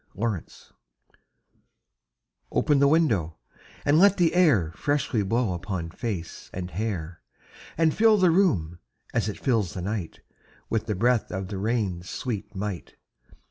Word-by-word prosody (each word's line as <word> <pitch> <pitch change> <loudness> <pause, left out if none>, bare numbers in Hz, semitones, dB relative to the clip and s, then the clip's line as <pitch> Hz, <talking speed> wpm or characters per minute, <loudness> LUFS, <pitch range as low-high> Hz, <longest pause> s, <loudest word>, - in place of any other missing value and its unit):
Nelson] 105 -4 -4 1.8
OPEN 145 -2 +2
the 140 - +5
window, 115 - +2 0.5
and 145 +2 +4
let 200 +1 +6
the 175 -3 +3
air 140 - +4
Freshly 145 -6 0
blow 110 0 0
upon 85 -2 -4
face 95 -5 -5
and 90 -1 -5
hair, 90 -4 -4 0.6
And 160 -1 +3
fill 220 -1 +5
the 185 -3 +4
room, 95 - +1 0.3
as 110 -2 0
it 105 - -6
fills 115 -9 0
the 90 - -4
night, 100 -3 -4 0.5
With 110 -1 -1
the 105 - -1
breath 120 +4 +1
of 95 0 -4
the 100 -2 -4
rain's 100 -5 -1
sweet 115 -7 -5
might. 95 -2 -5
110 Hz, 140 wpm, -26 LUFS, 90-145 Hz, 1.8 s, let